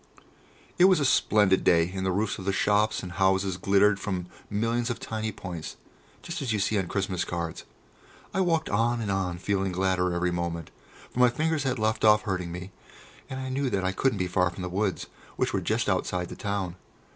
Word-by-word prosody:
It 180 - +8
was 185 -3 +5
a 140 - +1
splendid 105 -6 +3
day, 85 +1 +4
and 95 -1 -3
the 95 - +1
roofs 105 +3 -1
of 95 - -7
the 100 - +2
shops 105 +2 +2
and 90 - -6
houses 95 0 +1
glittered 100 +2 +3
from 95 -4 -3 0.2
millions 115 +3 0
of 120 - -3
tiny 110 0 -3
points, 90 -5 -7 0.5
just 170 -3 -5
as 130 -4 -2
you 110 - +1
see 105 +1 +1
on 95 - -2
Christmas 95 -1 -1
cards. 85 -2 -4 0.7
I 190 - +1
walked 165 -3 +1
on 115 +3 +1
and 105 -3 -2
on, 95 -3 -1
feeling 95 +1 -1
gladder 90 0 +1
every 90 0 0
moment, 85 -2 -3 0.4
for - - -5
my 125 0 +7
fingers 155 +5 0
had 130 -1 0
left 110 0 0
off 105 -1 +6
hurting 90 -4 -2
me 90 +2 -7 0.6
and 130 - -5
I 130 0 -4
knew 135 +1 0
that 95 -5 -1
I 95 - +1
couldn't 120 +4 +1
be 90 - 0
far 90 0 +2
from 90 +1 -8
the 90 - -3
woods, 95 0 -1 0.3
which - - 0
were - - 0
just - - 0
outside 90 -1 -1
the - - -7
town. 95 -3 -3
100 Hz, 210 wpm, -27 LUFS, 90-110 Hz, 0.7 s, It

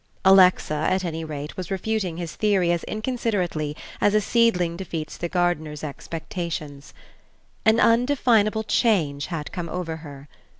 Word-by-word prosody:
Alexa, 185 -4 +6 0.2
at 185 0 0
any 165 -1 -3
rate, 150 -1 -6
was 185 -3 -6
refuting 195 -3 -2
his 170 -2 -5
theory 195 -5 +2
as 170 -1 -1
inconsiderately 205 - -2 0.2
as 205 0 +3
a - - +6
seedling 200 -6 +2
defeats 165 -4 -5
the 170 - -4
gardener's 160 -4 -1
expectations. 155 -1 -6 0.8
An 220 +1 +5
undefinable 230 -3 +3
change 160 - +1
had 165 -4 -5
come 170 -2 -5
over 165 -2 -4
her. 145 -3 -11
175 Hz, 135 wpm, -24 LUFS, 155-210 Hz, 0.8 s, Alexa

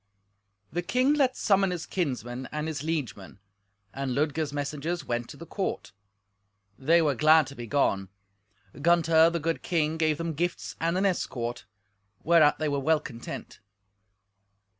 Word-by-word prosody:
The 175 - 0
king 255 - +2
let 270 -4 +2
summon 195 -1 +3
his 175 -3 -4
kinsmen 130 - -3
and 150 +1 -3
his 155 -4 -4
liegemen, 130 - -4 0.6
and 135 -2 -3
Ludger's 150 +1 0
messengers 145 +4 -3
went 120 0 -3
to 145 - -10
the 170 - -9
court. 195 +2 -4 0.8
They 165 +7 +3
were 145 -2 +2
glad 155 +3 +5
to 135 +2 -10
be 120 -2 -7
gone. 100 -8 +1 0.7
Gunther, 165 0 +5
the 170 0 -2
good 165 +2 -2
king, 160 -2 0
gave 155 -2 +1
them 165 0 -3
gifts 175 +4 -3
and 165 +2 +1
an 195 - +1
escort, 125 -10 -2 0.6
whereat 160 -2 +5
they 155 - -1
were 140 -1 0
well 155 +3 +2
content. 120 -5 -8
155 Hz, 150 wpm, -27 LUFS, 140-170 Hz, 0.8 s, glad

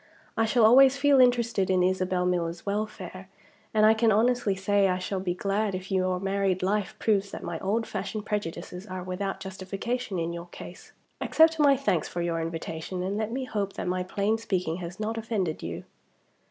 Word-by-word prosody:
I 225 - +2
shall 225 0 +4
always 265 +4 +7
feel 280 -1 +4
interested 235 -6 +3
in 185 -1 +3
Isabel 185 0 +1
Miller's 170 -1 -1
welfare; 200 -2 -4 0.4
and 215 -1 +4
I 220 - +7
can 225 0 +3
honestly 225 -1 +2
say 200 +1 +2
I 180 -1 +1
shall 190 +1 -3
be 180 -2 -2
glad 200 +1 -1
if 185 +2 -7
your 185 -1 +1
married 195 -1 0
life 200 +1 0
proves 200 -2 +1
that - - -8
my 165 -2 -4
old 220 +4 0
fashioned 215 -2 -4
prejudices 195 -1 -4
are 185 -1 -5
without 185 +2 -3
justification 195 +4 -4
in 170 0 -2
your 170 0 -7
case. - - -11 0.3
Accept 320 0 +4
my 280 -2 +5
thanks 255 - 0
for 175 - -3
your 165 -1 -1
invitation; 165 +2 -4
and 195 +2 -2
let 215 +1 -2
me 260 +2 -2
hope 205 -6 -3
that - - -5
my 180 0 0
plain 200 +4 0
speaking 180 -7 -1
has 180 +1 -7
not 220 +1 -2
offended 205 -8 -2
you." 85 +2 -5
195 Hz, 190 wpm, -27 LUFS, 180-220 Hz, 0.4 s, always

